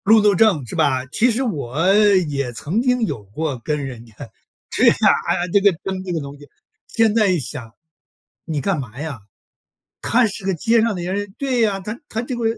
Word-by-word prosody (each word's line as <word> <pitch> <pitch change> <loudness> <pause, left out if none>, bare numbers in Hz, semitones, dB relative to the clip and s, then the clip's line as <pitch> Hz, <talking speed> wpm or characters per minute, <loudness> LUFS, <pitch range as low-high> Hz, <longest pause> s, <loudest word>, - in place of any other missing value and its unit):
路 220 +2 +6
怒 205 -1 +4
症 185 - +3
是 - - -7
吧。 135 -5 +1
其 240 - +3
实 240 +4 -1
我 160 - 0
也 175 -11 +2
曾 145 - -2
经 250 -1 +1
有 110 - -5
过 130 +7 -4
跟 150 -2 -2
人 120 -3 -8
家 115 - -19 0.6
是 - - +1
呀， - - +6 0.3
哎 - - +2
呀， - - -2
这 200 - +6
个 200 0 +5
争 190 -1 -4
这 185 - -5
个 165 - -1
东 140 0 -8
西。 145 0 -15 0.4
现 225 -2 +2
在 215 -2 +3
一 180 -3 +2
想， 120 -4 -7 0.7
你 160 -3 -2
干 195 -2 0
嘛 125 -1 -8
呀？ 145 -8 -6 0.8
他 245 +1 +3
是 200 0 -7
个 195 - +1
街 225 +7 +2
上 225 -2 +1
的 175 - -5
人 195 +2 -3
对 260 -3 0
呀， 205 -3 +1
他 210 +5 -6
他 225 - -2
这 250 +1 -4
个 240 - -4
185 Hz, 230 characters per minute, -20 LUFS, 140-215 Hz, 0.8 s, 路